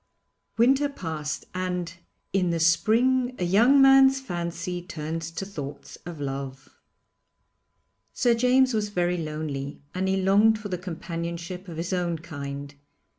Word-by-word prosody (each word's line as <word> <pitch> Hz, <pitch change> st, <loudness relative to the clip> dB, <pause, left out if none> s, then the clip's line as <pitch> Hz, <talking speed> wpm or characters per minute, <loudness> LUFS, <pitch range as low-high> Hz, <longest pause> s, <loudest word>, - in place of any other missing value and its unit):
Winter 270 Hz, +5 st, +4 dB
passed, 160 Hz, -, -5 dB
and 180 Hz, -2 st, -3 dB, 0.4 s
'in 185 Hz, -2 st, +2 dB
the 170 Hz, -1 st, 0 dB
spring 245 Hz, +9 st, +3 dB
a -, -, -2 dB
young 230 Hz, +10 st, +5 dB
man's 270 Hz, 0 st, +7 dB
fancy 175 Hz, -4 st, -4 dB
turns 165 Hz, -1 st, -5 dB
to 170 Hz, +4 st, -5 dB
thoughts 145 Hz, -8 st, -8 dB
of 170 Hz, -3 st, -7 dB
love.' 135 Hz, -1 st, -5 dB, 1.4 s
Sir 240 Hz, -2 st, +2 dB
James 250 Hz, +2 st, +3 dB
was 210 Hz, -1 st, 0 dB
very 180 Hz, -2 st, 0 dB
lonely 150 Hz, -3 st, -5 dB
and 185 Hz, +1 st, -1 dB
he 190 Hz, 0 st, +1 dB
longed 205 Hz, +4 st, +4 dB
for 210 Hz, -1 st, -7 dB
the 180 Hz, -, -2 dB
companionship 170 Hz, +1 st, -5 dB
of 165 Hz, -2 st, -8 dB
his 170 Hz, +3 st, -3 dB
own 175 Hz, -2 st, 0 dB
kind. 140 Hz, -2 st, -7 dB
180 Hz, 135 wpm, -26 LUFS, 160-215 Hz, 1.4 s, man's